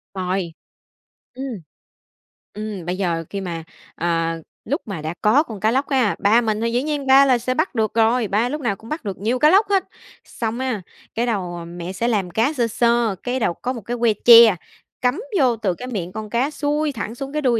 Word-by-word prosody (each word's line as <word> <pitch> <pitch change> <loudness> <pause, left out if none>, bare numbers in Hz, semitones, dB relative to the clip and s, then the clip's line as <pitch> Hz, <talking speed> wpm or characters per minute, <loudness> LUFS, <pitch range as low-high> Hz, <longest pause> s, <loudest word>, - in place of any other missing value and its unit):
Rồi. 185 -2 -2 0.8
Ừm. 265 +2 -5 1.1
Ừm, 210 -4 -6
bây 180 +1 -2
giờ 170 -4 -1
khi 200 - -4
mà, 170 -3 -5 0.3
à, 165 -1 -1 0.3
lúc 285 +6 -1
mà 190 -6 -5
đã 155 +2 -4
có 250 +9 +4
con 220 -8 -9
cá 215 +3 +2
lóc 270 +3 0
á, 255 -7 +2
ba 220 +4 +4
mình 220 -1 -1
thì 230 - 0
dĩ 245 +2 0
nhiên 295 -2 -3
ba 270 +1 +7
là 255 -3 +4
sẽ 250 +2 -2
bắt 255 - -1
được 220 -2 0
rồi, 230 +1 +2
ba 220 +5 +1
lúc 300 +1 -4
nào 220 -6 0
cũng 225 +3 -14
bắt 310 0 -4
được 195 -2 -4
nhiều 230 +5 -1
cá 300 - +6
lóc 400 +4 +5
hết. 390 -2 +3 0.4
Xong 230 +1 -4
á, 255 -6 -2 0.3
cái 235 - 0
đầu 180 -7 -3
mẹ 175 +2 -7
sẽ 230 +5 -1
làm 205 -6 0
cá 230 - +1
sơ 240 -5 0
sơ, 235 -1 +1
cái 250 +1 -1
đầu 215 - +1
có 250 +8 -4
một 235 - -7
cái 240 +5 -4
que 235 -2 +3
tre, 230 -4 +9 0.5
cắm 250 +10 +1 0.2
vô 250 -4 +3
từ 205 -4 -1
cái 250 - -8
miệng 185 -7 -4
con 215 +1 -6
cá 245 +6 0
xuôi 295 +1 -1
thẳng 230 -3 -5
xuống 275 +3 -6
cái 300 - -1
đuôi 245 -5 +2
230 Hz, 225 wpm, -21 LUFS, 195-255 Hz, 1.1 s, tre